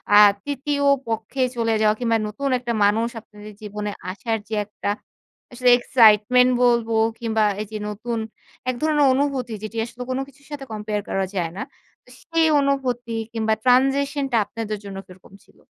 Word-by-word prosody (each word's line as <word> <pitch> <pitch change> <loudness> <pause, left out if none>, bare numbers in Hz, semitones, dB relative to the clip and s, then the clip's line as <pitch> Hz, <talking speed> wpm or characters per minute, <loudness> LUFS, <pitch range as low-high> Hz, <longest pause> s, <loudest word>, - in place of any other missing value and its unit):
আ - - +9 0.3
তৃতীয় 285 0 -2 0.2
পক্ষে 225 +4 -3
চলে 230 -1 0
যাওয়া 215 0 +4
কিংবা 230 -2 +2
নতুন 275 +7 -3
একটা 240 -1 -3
মানুষ 220 +3 +2
আপনাদের 210 -1 -13
জীবনে 210 0 -5 0.2
আসার 225 +3 -2
যে 220 - -2
একটা 210 0 -5 0.6
আসলে 250 0 +2
excitement 245 +1 +5
বলব 235 -2 +3 0.3
কিংবা 225 -2 0 0.2
এই 215 - -5
যে 215 - -4
নতুন 225 +3 -4 0.5
এক 255 - 0
ধরনের 300 -2 +3
অনুভূতি 265 -3 -1
যেটি 215 +1 -6
আসলে 245 +1 -8
কোন 260 +1 -1
কিছুর 280 0 -20
সাথে 285 -2 -6
compare 210 -1 -3
করা 195 0 0
যায় 170 -3 -1
না। - - -4 0.4
তো - - -21
সেই 330 -1 +2
অনুভূতি 250 -4 -1 0.2
কিংবা 220 -1 +1
transition 275 +3 +3
টা 235 - +3
আপনাদের 215 -1 -5
জন্য 195 -1 -7
কিরকম 185 +1 -17
ছিল? - - -26
235 Hz, 165 wpm, -22 LUFS, 215-265 Hz, 0.6 s, আ